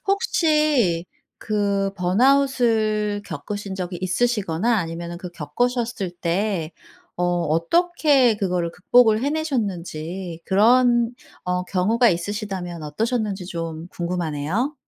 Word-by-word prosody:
혹시 305 - +2 0.3
그 200 -2 0
번아웃을 215 -1 +2
겪으신 195 +5 -5
적이 180 -1 -4
있으시거나 210 +1 +1
아니면은 170 0 -5
그 180 -1 -7
겪으셨을 225 - -2
때 175 -2 -1 0.4
어 180 - -2 0.3
어떻게 280 - +3
그거를 180 -4 -1
극복을 220 +4 +4
해내셨는지 190 - -3
그런 240 +3 +4 0.3
어 180 0 -1
경우가 220 +7 +2
있으시다면 180 -2 -3
어떠셨는지 205 +4 -2
좀 165 -1 -5
궁금하네요. 175 - -2
200 Hz, 260 characters per minute, -22 LUFS, 175-240 Hz, 0.4 s, 극복을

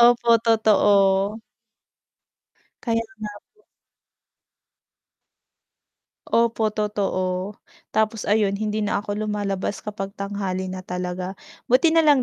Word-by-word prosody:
Opo, 235 -1 +6
totoo. 205 -2 +3 1.4
Kaya 230 -1 +1 0.2
nga 210 -1 -5 0.2
po. 425 - -29 2.7
Opo, 230 -2 +2
totoo. 200 -2 -2 0.3
Tapos 220 0 0
ayun 205 -1 +2
hindi 215 +1 -2
na 205 -1 0
ako 210 +1 -3
lumalabas 200 -1 -2
kapag 200 -2 -5
tanghali 195 -2 -3
na 185 - -5
talaga. 180 +1 -4 0.3
Buti 265 +7 +4
na 330 - +3
lang 285 -3 +6
210 Hz, 100 wpm, -23 LUFS, 195-220 Hz, 2.7 s, Opo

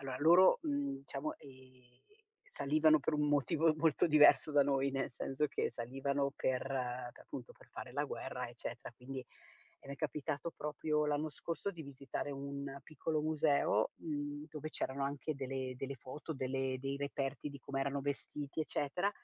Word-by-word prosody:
allora 135 -2 -4
loro, 175 +6 +7
mhmm, 285 - 0
diciamo, 140 +2 -4
ehm, 130 -2 -17 0.5
salivano 155 - +4
per 145 - 0
un 150 0 +2
motivo 150 +2 +3
molto 160 0 +3
diverso 150 0 +7
da 145 -1 +6
noi, 140 0 +2
nel 135 -2 -1
senso 135 +4 -1
che - - 0
salivano 140 +3 -1
per 130 -3 0
per 125 -2 -3
appunto 125 -1 -7
per - - -19
fare 125 - -8
la 145 +3 0
guerra, 125 -3 -4
eccetera, 120 +1 -7
quindi 130 +1 -6 0.6
e - - -13
m'è 140 - -5
capitato 150 +1 -2
proprio 150 0 0
l'anno 150 +1 0
scorso 165 +6 -3
di 175 -4 -10
visitare 140 0 -5
un 140 0 -5
piccolo 155 0 -1
museo, 150 -8 +3
mhmm, 145 -1 -4
dove 155 0 -5
c'erano 135 -2 -2
anche 145 +2 -2
delle 130 -1 -3
delle 135 +2 -4
foto, 135 +6 -7
delle 130 -1 -1
dei 135 +1 -3
reperti 140 0 -2
di 140 -1 -9
come 135 +1 -3
erano 140 0 -1
vestiti 145 +1 -3
eccetera 155 +5 0
140 Hz, 160 wpm, -36 LUFS, 135-150 Hz, 0.6 s, loro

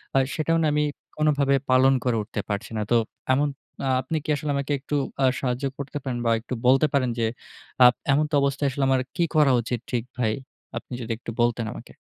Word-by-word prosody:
আ - - +5 0.2
সেটাও 165 +1 +1
না - - +3
আমি 150 0 +2 0.3
কোনভাবে 145 -2 +3 0.2
পালন 130 +1 +5
করে 120 -3 +1
উঠতে 105 0 -4
পারছি 105 +3 -3
না। 105 - 0
তো 120 - +6 0.4
এমন 145 +3 +2 0.4
আ - - +1
আপনি 155 +5 -2
কি - - -8
আসলে 145 +1 -3
আমাকে 140 +1 -2
একটু 145 +2 -4 0.3
আ - - +6
সাহায্য 125 +1 -1
করতে 140 +1 -5
পারেন 125 -3 -3
বা 115 - +3
একটু 115 - -7
বলতে 135 +4 +5
পারেন, 130 -3 +2
যে 115 - +2 0.6
আ - - +10 0.3
এমনত 150 +2 +2
অবস্থায় 140 +1 +1
আসলে 140 0 -2
আমার 130 -1 +3
কি 175 - +2
করা 150 -3 +5
উচিত 120 +1 -3
ঠিক 120 -3 0
ভাই? 110 -3 +1 0.4
আপনি - - -8
যদি 115 0 -5
একটু 115 - -7
বলতেন 120 -1 +1
আমাকে। - - -11
135 Hz, 210 wpm, -25 LUFS, 120-145 Hz, 0.6 s, আ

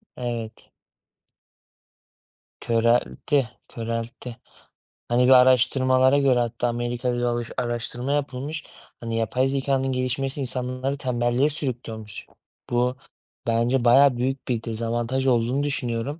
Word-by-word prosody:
Evet. 120 -3 -5 1.9
Köreltti, 120 +3 +1 0.3
köreltti. 115 +1 -5 0.7
Hani 125 +1 +3
bir - - +5
araştırmalara 130 +1 +5
göre 135 -3 +3
hatta 120 0 -1
Amerika'da 120 +1 -2
bir - - -2
alış 120 -1 -1
araştırma 120 +2 -2
yapılmış. 145 +2 -3 0.4
Hani 115 -1 -3
yapay 125 +4 +1
zekânın 135 -1 0
gelişmesi 130 +2 -2
insanları 130 +2 -2
tembelliğe 125 +1 +1
sürüklüyormuş. 115 -7 -5 0.4
Bu 125 +1 +1 0.5
bence 120 +2 +1
bayağı 130 +1 +6
büyük 130 +2 -2
bir 120 -3 -1
dezavantaj 120 +3 -2
olduğunu 125 +3 +2
düşünüyorum. 140 -1 -2
125 Hz, 105 wpm, -24 LUFS, 120-135 Hz, 1.9 s, bayağı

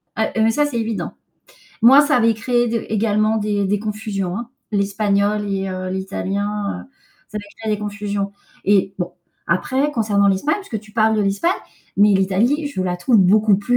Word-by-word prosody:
Ah, 220 - 0
heu, 220 0 +3
ça, 295 +5 +2
c'est 280 -5 -2
évident. 225 -1 -3 0.7
Moi, 265 +5 +9
ça 290 -1 +2
avait 230 -2 +3
créé 240 +2 +1
d 230 -1 -2
également 215 0 +1
des 205 -2 0
des 205 +2 +1
confusions, 205 -3 -3
hein. 235 +1 -6 0.2
L'espagnol 205 0 +1
et 195 0 -2
heu, 185 0 -4
l'italien, 200 +2 -3
heu, - - -29 0.4
ça 215 - -8
avait 210 - -5 0.2
créé 220 -1 -1
des - - -5
confusions. 205 -1 -3 0.3
Et 195 -1 +2
bon, 175 -1 -3 0.3
après 260 +11 +1
concernant 205 -5 +2
l'Espagne, 195 - +1
puisque 240 - -6
tu 215 0 -18
parles 220 0 +3
de 210 - +2
l'Espagne, 200 - +1 0.5
mais 205 +1 +5
l'Italie, 205 +11 +1
je 280 -10 -3
la 180 -1 -1
trouve 225 +7 +2
beaucoup 205 +2 +5
plus 245 +5 +1
210 Hz, 185 wpm, -20 LUFS, 200-225 Hz, 0.7 s, Moi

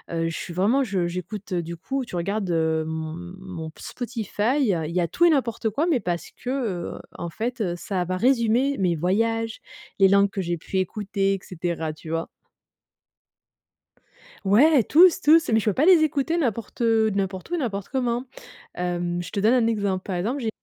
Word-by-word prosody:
heu 165 0 0
je 165 - -5
suis 175 - -6
vraiment 215 +10 +2
je 195 -7 -1
j'écoute 185 +3 -5
du 170 -1 -3
coup 265 +9 -3
tu 180 - -8
regardes, 195 +3 -2
heu, 160 -1 +1
m 160 +3 -5
mon 180 -4 -7
Spotify, 235 0 -2
il 170 - 0
y - - +3
a 170 - +1
tout 345 - +2
et - - +7
n'importe 235 -6 +1
quoi 285 +10 0
mais 325 -7 +2
parce 175 -5 -3
que, 250 - -8
heu, 225 -10 -3 0.2
en 170 - -4
fait, 235 +6 -4
heu, 180 -4 0
ça 185 0 -2
va 185 +1 -2
résumer 250 +4 +2
mes 180 -3 +2
voyages, 225 +7 0 0.4
les 195 - +7
langues 200 +1 +4
que 195 - -3
j'ai 175 -1 -2
pu 190 +4 -5
écouter 195 +1 -1
et - - -6
cetera 165 -3 -3
tu 155 +1 -12
vois? 165 0 -2 2.2
Ouais, 255 +8 +5
tous, 360 +3 +6
tous, 315 -4 +5
mais 220 - +4
je 220 - -6
peux 210 - +2
pas 290 - +2
les 355 -3 +7
écouter 310 +2 +1
n'importe 230 -5 -2
heu, 225 -2 +3
n'importe 195 - -3
où - - -1
et - - -2
n'importe 205 - -3
comment. 245 -2 -1 0.5
Hem, 175 0 -2
je 175 - -8
te 205 - -3
donne 220 +4 +4
un 245 -3 +3
exemple. 200 -4 0
Par 185 -3 -4
exemple, 230 +11 -2
j'ai 230 - -2
200 Hz, 200 wpm, -24 LUFS, 175-245 Hz, 2.2 s, et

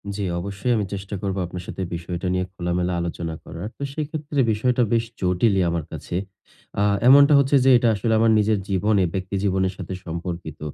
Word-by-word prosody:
জি, 100 - -3 0.2
অবশ্যই 100 +6 -2
আমি 105 - 0
চেষ্টা 100 +1 -5
করব 100 -1 -2
আপনার 90 +1 -7
সাথে 95 - -6
বিষয়টা 85 +2 -4
নিয়ে 90 0 0
খোলা-মেলা 90 -1 -1
আলোচনা 85 -1 -4
করার। 85 +5 -7
তো - - -6
সেক্ষেত্রে 150 -1 -4
বিষয়টা 125 +3 +1
বেশ 115 0 +3 0.2
জটিলই 95 +2 +2
আমার 85 -1 -2
কাছে। 85 - -6 0.7
আ - - +3 0.2
এমনটা 140 +3 +8
হচ্ছে 140 +1 +2
যে - - +6
এটা 120 0 +1
আসলে 110 +3 0
আমার 115 0 +4
নিজের 105 -1 +2
জীবনে, 100 +1 +2
ব্যক্তি 95 +1 -3
জীবনের 95 -1 +1
সাথে - - -6
সম্পর্কিত। 85 -2 -6
95 Hz, 180 wpm, -23 LUFS, 90-115 Hz, 0.7 s, এমনটা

